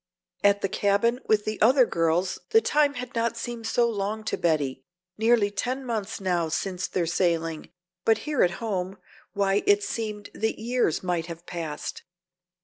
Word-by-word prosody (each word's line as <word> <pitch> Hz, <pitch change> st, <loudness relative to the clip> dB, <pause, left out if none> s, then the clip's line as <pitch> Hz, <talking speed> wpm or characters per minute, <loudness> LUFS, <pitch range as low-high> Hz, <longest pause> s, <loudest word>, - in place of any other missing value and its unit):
At 200 Hz, 0 st, +4 dB
the -, -, +1 dB
cabin 205 Hz, +5 st, +1 dB
with 210 Hz, -1 st, +3 dB
the 215 Hz, 0 st, -3 dB
other 255 Hz, +3 st, +6 dB
girls 170 Hz, 0 st, 0 dB
the 445 Hz, 0 st, +6 dB
time 295 Hz, -8 st, +2 dB
had 250 Hz, -1 st, -6 dB
not 230 Hz, 0 st, 0 dB
seemed 235 Hz, -2 st, -5 dB
so 235 Hz, +1 st, +3 dB
long 215 Hz, 0 st, -2 dB
to 220 Hz, -, -1 dB
Betty, 145 Hz, -6 st, 0 dB, 0.3 s
nearly 220 Hz, -2 st, +3 dB
ten 255 Hz, +6 st, -3 dB
months 220 Hz, -3 st, -3 dB
now 175 Hz, -4 st, 0 dB
since 185 Hz, +2 st, -2 dB
their 175 Hz, -, -1 dB
sailing, 165 Hz, -2 st, 0 dB, 0.3 s
but 225 Hz, -, +4 dB
here 300 Hz, -2 st, 0 dB
at 180 Hz, -, +5 dB
home 195 Hz, -4 st, -3 dB, 0.4 s
why 200 Hz, 0 st, +2 dB
it 205 Hz, 0 st, +5 dB
seemed 210 Hz, -1 st, -4 dB
that 220 Hz, +1 st, -1 dB
years 235 Hz, -7 st, 0 dB
might 175 Hz, -2 st, -1 dB
have 170 Hz, 0 st, -8 dB
passed. 165 Hz, -4 st, -5 dB
205 Hz, 165 wpm, -26 LUFS, 175-230 Hz, 0.4 s, other